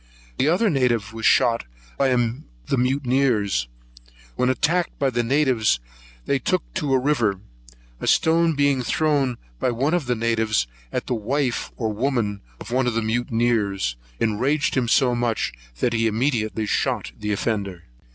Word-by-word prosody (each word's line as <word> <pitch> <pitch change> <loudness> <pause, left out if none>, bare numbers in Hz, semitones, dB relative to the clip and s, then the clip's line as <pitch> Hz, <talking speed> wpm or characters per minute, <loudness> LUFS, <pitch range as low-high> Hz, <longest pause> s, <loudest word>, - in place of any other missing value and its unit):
The 135 - +3
other 180 +8 +3
native 120 -7 +1
was 115 -1 0
shot 115 - +3 0.3
by 135 - +2
the 115 - -2
mutineers; 125 - +1 0.7
when 125 - +1
attacked 170 +6 0
by 135 -2 +1
the 120 0 +1
natives 125 - +2 0.5
they 140 - +1
took 185 +8 0
to 150 -7 -1
a - - +3
river; 120 -8 +1 0.6
a - - -4
stone 165 0 +3
being 140 -2 +2
thrown 140 -1 +1 0.2
by - - +1
one 135 +6 0
of 170 -7 0
the 125 - +1
natives 110 - +1 0.3
at - - -2
the - - -2
wife, 125 +3 -1
or 110 -3 -1
woman, 110 -4 -1 0.2
of - - -9
one 130 0 +1
of 120 - 0
the 115 - 0
mutineers, 110 - 0 0.2
enraged 130 +7 +1
him 130 -3 +1
so 125 +1 +3
much, 120 -2 -1 0.3
that 120 - +2
he 115 0 +2
immediately 110 -2 0
shot 80 - -1
the 105 - -2
offender. 100 -4 -2
120 Hz, 155 wpm, -23 LUFS, 110-135 Hz, 0.7 s, The